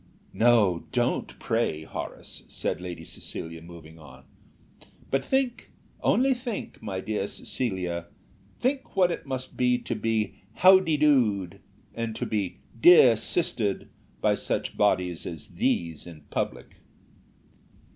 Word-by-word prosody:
"No, 110 -7 +3
don't 120 0 -1
pray, 115 -10 -1
Horace," - - -7
said - - -3
Lady 85 -2 -6
Cecilia, 80 0 -7
moving 80 -1 -12
on. 65 -3 -14 0.9
"But 135 0 +1
think, 265 - -1 0.3
only 265 +2 +3
think, 240 -4 -6
my 95 -4 -4
dear 110 +1 -2
Lady 100 - -2
Cecilia; 90 -8 -3 0.5
think 265 -1 -1
what 180 -2 +4
it 160 - -5
must 130 -1 -5
be 125 0 +3
to - - -4
be 110 -1 -1
'How 185 +8 +7
d'ye 165 -5 0
doed,' 115 - +2 0.3
and 115 -1 -3
to - - -3
be 100 -4 -2 0.2
'dear 150 -9 +8
sistered' 110 - 0 0.3
by - - +3
such - - -2
bodies 90 -4 +1
as 80 -4 -7
these 85 -1 -1
in 80 -3 -11
public." - - -3
110 Hz, 130 wpm, -27 LUFS, 85-135 Hz, 0.9 s, dear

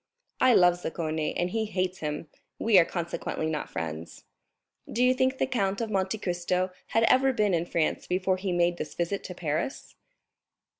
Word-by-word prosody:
"I 255 -2 +5
love 175 -1 +5
Zaccone, 160 -2 -2
and 175 0 0
he 225 +1 0
hates 185 -2 -2
him; 150 +1 -4 0.3
we 215 -4 +5
are 170 - +5
consequently 170 -2 -3
not 155 -1 -2
friends." 80 0 -6 0.7
"Do 240 - +1
you 250 0 +5
think 260 +1 +1
the - - +2
Count 200 -7 -1
of 225 -2 -3
Monte 195 +1 0
Cristo 180 -1 -1 0.2
had 225 - +2
ever 265 +3 +5
been 210 -6 +1
in 170 0 0
France 165 -2 -1
before 185 +1 +1
he 185 0 -2
made 175 0 +2
this 150 - -6
visit 175 +3 -2
to 180 - -6
Paris?" 155 - -3
185 Hz, 180 wpm, -28 LUFS, 170-215 Hz, 0.7 s, I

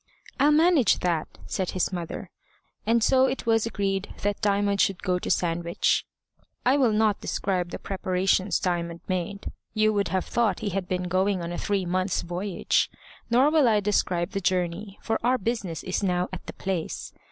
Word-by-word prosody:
"I'll 285 +2 +5
manage 315 -4 +4
that," 170 -3 0 0.2
said 190 -2 -2
his 185 +1 -1
mother; 175 -2 -5 0.6
and 230 0 +3
so 265 +1 +5
it 265 - -3
was 225 -1 +2
agreed 195 -3 -2
that 205 0 -1
Diamond 200 -1 +2
should 195 -2 +1
go 180 -2 +1
to - - -5
Sandwich. 170 0 +1 0.6
I 255 +2 +5
will 260 -5 +3
not 215 -1 +2
describe 180 -3 -1
the - - -5
preparations 190 0 0
Diamond 170 -2 -2
made. 185 +2 -3 0.2
You 215 0 +3
would 200 -2 +1
have 185 +2 -1
thought 225 -6 0
he 215 - -1
had 190 -1 -3
been 180 0 -1
going 185 +1 +1
on 170 - -4
a 175 - -4
three 200 -2 0
months' 185 +1 0
voyage. 175 +2 0 0.4
Nor 255 +5 +4
will 305 -5 +4
I 215 -2 +4
describe 185 -3 0
the 195 -3 -2
journey, 185 +2 -1
for 225 - -1
our 250 +2 +3
business 200 -7 -3
is 185 - -2
now 180 -2 0
at 185 - -7
the - - -6
place. 185 -4 -4
195 Hz, 180 wpm, -26 LUFS, 180-215 Hz, 0.6 s, I'll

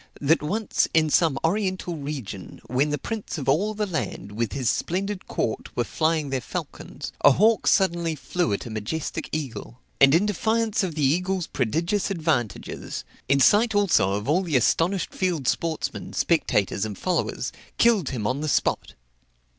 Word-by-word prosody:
that 155 +4 +3
once, 205 +8 0
in 155 -1 +3
some 160 -5 +3
oriental 185 0 -1
region, 140 - -6
when 135 +4 +1
the 150 - 0
prince 215 - -5
of 140 -3 -5
all 195 +11 +2
the 210 0 -1
land, 130 - -4
with 110 0 -2
his 130 -3 -2
splendid 190 - -1
court, 110 - -2
were 120 - +2
flying 155 +1 0
their 130 -1 -1
falcons, - - -6
a 145 - +8
hawk 220 - +3
suddenly 170 -4 +2
flew 175 -2 -1
at 100 - -2
a 120 - -7
majestic 110 +9 -4
eagle; 130 -5 -5 0.2
and 135 +2 +7
in 180 +5 +3
defiance 220 +2 +1
of 180 -5 -2
the 150 -3 +1
eagle's 180 +5 +1
prodigious 165 - -1
advantages, 155 - -2 0.3
in 140 0 +4
sight 215 - +4
also 180 - +3
of 105 +3 -3
all 160 +6 +3
the 165 -7 +1
astonished 170 - +1
field 175 -8 -1
sportsmen, 165 +1 -2
spectators, 105 - +1
and 105 -2 -4
followers, 185 -2 -1 0.3
killed 225 - +3
him 115 -5 -4
on 130 +7 -1
the 155 - -1
spot. - - 0
160 Hz, 165 wpm, -25 LUFS, 130-185 Hz, 0.3 s, a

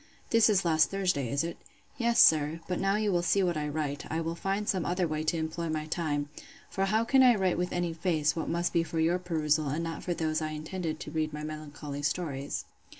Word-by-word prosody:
This 230 -1 +5
is 195 -3 +2
last 160 -1 +4
Thursday, 180 -10 0
is 140 +5 0
it? 170 - -4 0.4
Yes, 235 -1 +2
sir; 155 +1 +5
but 180 - -2
now 195 +1 +2
you 210 -1 +1
will 175 -2 +2
see 195 +3 +2
what 175 -2 +1
I 150 -1 -2
write, 145 -1 -3
I 160 - 0
will 165 0 -2
find 195 +4 -2
some 185 -3 +1
other 175 +2 0
way 155 0 -2
to 165 - +1
employ 160 +1 -3
my 155 -1 -2
time: 155 -3 -2 0.4
for 195 - 0
how 215 +3 +2
can 265 +3 +4
I 250 -2 +7
write 190 -4 +1
with 180 0 -1
any 175 -1 -1
face, 160 -3 0
what 165 - -3
must 170 +1 0
be 170 - +3
for 165 0 -3
your 170 +3 +2
perusal, 155 -4 0
and 155 +4 -2
not 165 0 -4
for 175 - -2
those 160 -1 -1
I 155 0 -3
intended 155 +1 -4
to - - -7
read 155 -1 -1
my 150 0 -5
melancholy 150 -2 -6
stories? 145 -2 -2
165 Hz, 235 wpm, -29 LUFS, 155-180 Hz, 0.4 s, I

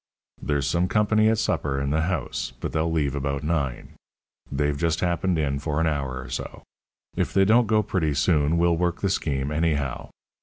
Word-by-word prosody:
There's 70 -2 0
some 85 +5 +1
company 110 +2 +3
at 110 - +2
supper 70 -8 0
in 70 0 -1
the 80 +2 +2
house, 80 -5 -2
but - - -4
they'll 80 +1 0
leave 75 -4 0
about 70 0 -2
nine. 75 -5 -2 0.6
They've 75 +1 0
just 80 +2 0
happened 90 0 0
in 70 -3 0
for 75 +1 -2
an 80 - +2
hour 70 -5 -2
or 65 - -10
so. - - -6 0.5
If - - -1
they 95 0 +5
don't 115 +3 +4
go 110 0 +3
pretty 85 -7 -1
soon, 75 +1 +2
we'll 85 0 +3
work 85 0 -1
the 95 - +1
scheme 70 -5 -1
anyhow. 75 -5 -1
80 Hz, 190 wpm, -25 LUFS, 70-90 Hz, 0.6 s, they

